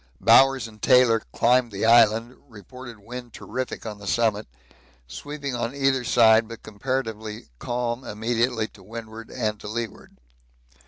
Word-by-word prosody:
Bowers 135 -2 +5
and 105 -1 -16
Taylor 125 -3 +5
climbed 125 0 +2
the 100 +2 -2
island; 115 +1 +4
reported 120 +3 -11
wind 120 +3 -10
terrific 130 -2 -6
on 105 -2 -7
the 100 - -10
summit 110 -1 0 0.6
sweeping 145 - -6
on 120 +2 -3
either 135 -2 +1
side 115 -2 +4
but 115 0 -10
comparatively 110 -1 -5
calm 120 +1 -3
immediately 115 +1 -1
to 100 - -18
windward 110 +2 -9
and 110 -4 -3
to - - -9
leeward. 115 +1 -6
115 Hz, 140 wpm, -24 LUFS, 110-125 Hz, 0.6 s, Bowers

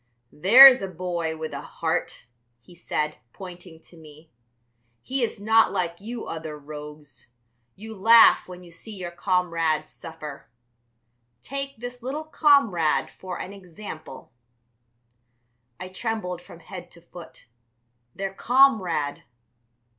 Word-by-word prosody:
"There's 255 - +9
a 195 - -3
boy 170 -3 -4
with 155 -1 -6
a 140 - -5
heart," 165 +1 -4 0.3
he 120 +9 -19
said, 155 -3 -3
pointing 180 -3 -11
to - - -18
me; 155 0 -16 0.7
"he 265 0 -2
is 230 -4 -2
not 220 0 +4
like 175 -2 -3
you 230 +3 -7
other 160 -2 -6
rogues; 150 -2 -11 0.5
you 220 +2 -10
laugh 225 +3 +6
when 180 0 -11
you 175 - -15
see 210 +6 -10
your 180 -3 -6
comrades 170 -4 -1
suffer. 155 -6 -10 0.9
Take 275 0 -5
this 245 +2 -8
little 275 +6 -4
comrade 280 - +2
for 185 - -8
an 190 - -7
example." 180 -8 -11 1.5
I 180 - -6
trembled 185 -2 -4
from 170 - -15
head 175 +1 -10
to 170 - -16
foot. 175 0 -14 0.7
Their 195 0 -4
comrade! 200 - +2
180 Hz, 125 wpm, -24 LUFS, 160-220 Hz, 1.5 s, There's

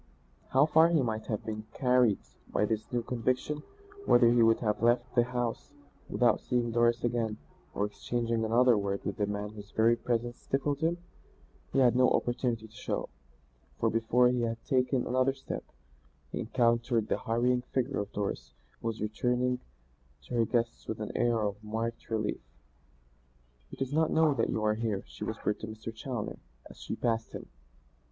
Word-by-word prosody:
How 135 +2 +5
far 160 +2 +5
he 160 -5 +3
might 110 -2 -3
have 105 -3 -3
been 110 -1 -4
carried 125 -5 +4 0.3
by 105 - +2
this 110 0 -3
new 120 -1 0
conviction; 130 +5 -1 0.5
whether 120 -1 +6
he 120 0 +4
would 115 0 +5
have 105 -3 0
left 120 +1 +2
the 120 -1 +4
house 120 -2 -3 0.4
without 120 -1 +3
seeing 120 -2 0
Doris 120 +1 +2
again 115 -3 0 0.4
or 100 - +1
exchanging 115 +2 -2
another 120 +2 +4
word 100 -1 -2
with 100 - -3
the 105 - 0
man 105 0 -3
whose 105 -1 -11
very 115 +2 +3
presence 120 0 -2
stifled 140 +1 -1
him, 165 +2 +1 0.7
he - - -1
had 125 -2 +5
no 125 0 +5
opportunity 120 -2 0
to 110 - -23
show, - - -3 0.7
for 115 - +2
before 115 +2 +3
he 125 -1 0
had 115 0 -3
taken 130 -1 +1
another 130 +2 +2
step, 135 - -6 0.7
he - - -3
encountered 115 -1 +1
the - - 0
hurrying 125 +2 +1
figure 130 +1 -2
of 100 0 -4
Doris, 100 -12 -4 0.3
who - - -3
was 110 -2 -3
returning 125 +4 0 0.6
to - - -9
her 115 -1 +3
guests 115 +1 -1
with 110 - -4
an 105 - -5
air 120 -2 +2
of 105 0 -3
marked 115 +2 -4
relief. 110 -2 -1 1.3
"He - - -10
does 135 +1 -3
not 160 +1 +3
know 160 -2 +4
that 115 -4 0
you 110 - -1
are 105 - +3
here," 110 -3 -2
she - - -9
whispered 105 - -2
to 110 - -6
Mr. 110 +1 -7
Challoner, 115 0 -5 0.3
as - - -14
she - - -4
passed 115 -1 -1
him. - - -8
115 Hz, 175 wpm, -30 LUFS, 110-125 Hz, 1.3 s, whether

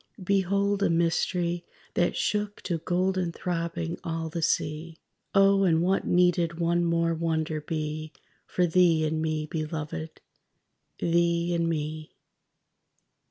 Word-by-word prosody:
_ - - -7
_Behold, 200 +1 +1
a - - +3
mystery 170 +1 +1 0.3
That 175 - +1
shook 210 -1 -1
to 170 -3 -2
golden 180 +1 0
throbbing 170 -1 -3
all 165 -1 -3
the 165 +1 -4
sea. 155 +1 -1 0.4
Oh, 195 0 +5
and 165 -3 +3
what 190 +2 +1
needed 175 -1 +2
one 170 +1 +2
more 170 0 +1
wonder 160 -1 -1
be 155 0 -4 0.4
For 180 - +1
thee 170 -2 +4
and 155 0 -1
me, 155 -1 -1
Belovèd? 155 0 -5 0.8
thee 170 0 +1
and 170 -1 +1
me? 155 -1 -4
170 Hz, 125 wpm, -27 LUFS, 160-175 Hz, 0.8 s, Oh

